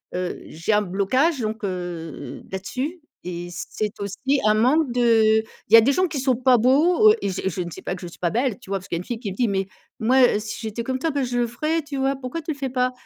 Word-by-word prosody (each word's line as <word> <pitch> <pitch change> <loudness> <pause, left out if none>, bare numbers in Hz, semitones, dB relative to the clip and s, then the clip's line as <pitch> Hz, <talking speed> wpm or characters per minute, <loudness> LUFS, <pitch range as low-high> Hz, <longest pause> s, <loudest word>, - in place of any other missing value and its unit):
heu, 180 0 -3
j'ai 165 +7 -3
un 210 - +4
blocage 215 - +1
donc 220 +1 -3
heu, 170 -7 -5
là-dessus 260 - -4 0.3
et 175 0 -5
c'est 210 +4 -4
aussi 265 +8 -1
un 215 - +5
manque 260 +5 +3
de, 225 -3 +4
heu, - - -16 0.2
il - - -6
y - - +12
a - - +9
des 270 +5 +3
gens 370 +3 +2
qui 300 -4 -4
sont 260 -1 +2
pas 255 0 +4
beaux 330 - +5
et - - -1
je 190 0 -3
je 180 +1 -4
ne 175 - -4
sais - - -9
pas - - -2
que 180 - -11
je - - -5
sois 170 0 -3
belle, 240 -1 -1
tu - - -16
vois? 195 - 0
Parce 190 - -11
qu'il 170 - -2
y - - -3
a - - -4
une - - -9
fille 235 +1 -5
qui 205 -6 -4
me - - -7
dit: 240 +1 +1
«Mais 195 -1 -1 0.3
moi, 255 +4 +4
heu, 215 - +4
si 215 0 -6
j'étais 225 +1 -4
comme 260 +1 -2
toi, 325 - 0
bah 280 -2 -1
je 245 -1 -1
le 240 - +1
ferais, 310 +8 -1
tu 285 -2 -6
vois? 270 +1 +1
Pourquoi 265 +5 -5
tu 315 - -3
le 285 - -5
fais 270 -2 -3
pas? 250 0 +1
235 Hz, 285 wpm, -23 LUFS, 195-270 Hz, 0.3 s, y